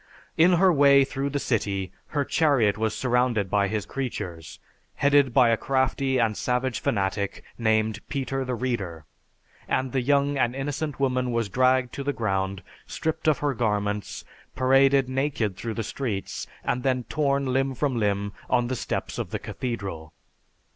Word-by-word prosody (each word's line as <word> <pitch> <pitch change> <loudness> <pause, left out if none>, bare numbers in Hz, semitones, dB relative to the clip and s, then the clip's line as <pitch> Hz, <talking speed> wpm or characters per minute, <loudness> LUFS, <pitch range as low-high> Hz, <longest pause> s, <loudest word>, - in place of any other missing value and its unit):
In 175 +3 +5
her 180 +1 +5
way 140 -2 +6
through 135 +1 -3
the 140 - -2
city, 100 -8 -1 0.2
her 145 -2 -1
chariot 135 -12 +3
was 110 0 -1
surrounded 125 -6 +1
by 100 -1 +3
his 105 0 -2
creatures, 90 - -5 0.4
headed 140 -2 +4
by 120 -1 +5
a 115 - +3
crafty 130 +1 0
and 115 -3 +1
savage 125 +1 -1
fanatic 100 -1 -1
named 110 -1 +1
Peter 135 -1 -2
the 130 -1 -2
Reader, 100 - -3 0.6
and 130 -1 0
the 130 - 0
young 140 +1 +2
and 120 0 +1
innocent 145 +1 -3
woman 130 -2 +1
was 115 -3 -1
dragged 130 +2 +2
to 140 - -4
the 145 +1 -1
ground, 95 -4 -2 0.2
stripped 160 0 -3
of 155 - +4
her 145 - +2
garments, 105 -3 -2 0.3
paraded 135 +1 +4
naked 130 -6 -1
through 115 +3 -5
the 115 - -2
streets, 110 -4 -4 0.2
and 125 - -1
then 130 -1 0
torn 140 -2 0
limb 135 0 +1
from 135 0 0
limb 100 -1 0 0.2
on 120 -1 +2
the 130 - -1
steps - - -4
of - - -3
the - - -2
Cathedral. 100 -11 -5
125 Hz, 160 wpm, -25 LUFS, 105-135 Hz, 0.6 s, way